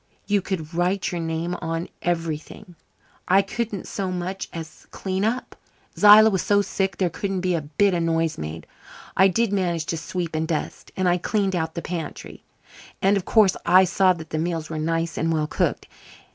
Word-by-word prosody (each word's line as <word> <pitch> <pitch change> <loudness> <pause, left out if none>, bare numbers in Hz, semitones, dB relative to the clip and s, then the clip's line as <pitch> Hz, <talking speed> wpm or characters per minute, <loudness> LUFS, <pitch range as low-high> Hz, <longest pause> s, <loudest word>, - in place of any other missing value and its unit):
You 205 -1 +2
could 170 -4 -4
write 180 +3 0
your 175 -1 -3
name 165 +2 -2
on 165 +1 -3
everything. 170 +3 -3 0.5
I 195 +2 +5
couldn't 215 0 -4
so 195 -2 -3
much 185 +2 -4
as 160 -2 -9
clean 190 0 -3
up. 235 +4 -2 0.4
Zillah 215 +1 +8
was 190 -3 0
so 205 0 +3
sick 195 0 -2
there 180 -3 0
couldn't 195 -2 -3
be 180 0 0
a 165 - 0
bit 170 +7 +1
of 175 - 0
noise 165 -1 0
made. 80 +1 -6 0.5
I 190 - +6
did 215 +2 +1
manage 175 -5 0
to 165 - -2
sweep 170 +1 -4
and 160 0 -1
dust, 160 -3 -4
and 185 -1 +1
I 175 0 +3
cleaned 195 0 0
out 160 -2 -2
the 170 - -4
pantry. 170 -3 -6 0.6
And, 195 +2 +3
of 195 - -2
course, 215 -4 +4
I 185 +2 +6
saw 190 0 +3
that 160 -2 -10
the 155 - -1
meals 165 -1 -2
were 155 - -3
nice 165 0 -1
and 165 +1 +1
well 155 -2 +1
cooked. - - -1
175 Hz, 190 wpm, -23 LUFS, 165-195 Hz, 0.6 s, Zillah